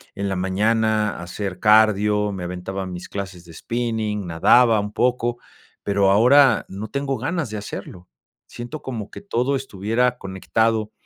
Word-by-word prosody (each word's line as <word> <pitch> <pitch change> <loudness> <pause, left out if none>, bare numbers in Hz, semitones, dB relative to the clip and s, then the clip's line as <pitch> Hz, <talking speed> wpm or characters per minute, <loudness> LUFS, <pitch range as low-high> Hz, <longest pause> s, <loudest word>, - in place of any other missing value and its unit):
en 100 -1 -2
la 95 - -1
mañana 105 +3 +1
a - - -7
hacer 90 +1 -5
cardio, 105 -1 +4
me 95 -2 -6
aventaba 90 +2 -5
mis 90 -1 -7
clases 95 -3 -7
de 85 - -13
spinning, 110 -1 -3
nadaba 110 +7 +4
un 105 0 -4
poco, 120 -1 0 0.5
pero, 100 -1 +2
ahora 125 +4 +5
no 100 +3 -7
tengo 140 0 -2
ganas 145 +1 -2
de 105 - -4
hacerlo. 90 -3 -8 0.4
Siento, 120 +5 -8
como 115 -6 -6
que - - -9
todo 140 - -1
estuviera 125 0 -1
conectado 110 +3 -1
105 Hz, 150 wpm, -22 LUFS, 95-120 Hz, 0.5 s, ahora